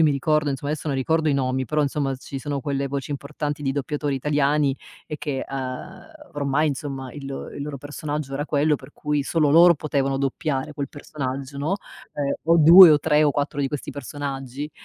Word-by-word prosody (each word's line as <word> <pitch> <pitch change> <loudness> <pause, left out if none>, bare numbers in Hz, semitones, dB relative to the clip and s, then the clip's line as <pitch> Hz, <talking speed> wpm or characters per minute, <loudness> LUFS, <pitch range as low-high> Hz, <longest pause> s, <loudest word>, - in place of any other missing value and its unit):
io - - +6
mi 150 - +4
ricordo 150 +2 +1
insomma 140 +1 -3
adesso 155 +1 -4
non 140 - -1
ricordo 160 +4 +1
i 145 - +2
nomi, 130 -1 0
però 150 +3 0
insomma 140 -1 -1
ci 135 +1 -7
sono 145 +2 -4
quelle 140 -1 -2
voci 140 +1 -4
importanti 145 +1 -4
di 135 - 0
doppiatori 145 0 -2
italiani 145 0 +1 0.3
e 150 - -6
che, 140 -3 -3
ehm, 135 - -6 0.2
ormai 145 +2 +1
insomma 135 -3 -5
il 145 -2 -9 0.3
il 140 - -4
loro 145 -1 -5
personaggio 145 0 -5
era 145 +2 -3
quello 150 +1 +2
per - - -15
cui 150 -1 -1
solo 155 -3 +2
loro 170 +3 +7
potevano 140 -2 -1
doppiare 140 +1 -2
quel 140 -2 -4
personaggio, 140 -1 -6
no, 155 +7 0 0.4
ehm, 140 -1 -1
o 165 +1 +4
2 170 +3 +10
o 150 - +5
3 150 0 +3
o 145 - +3
4 145 0 -2
di 140 - +1
questi 145 0 -5
personaggi, 140 0 -5
145 Hz, 200 wpm, -23 LUFS, 135-150 Hz, 0.4 s, 2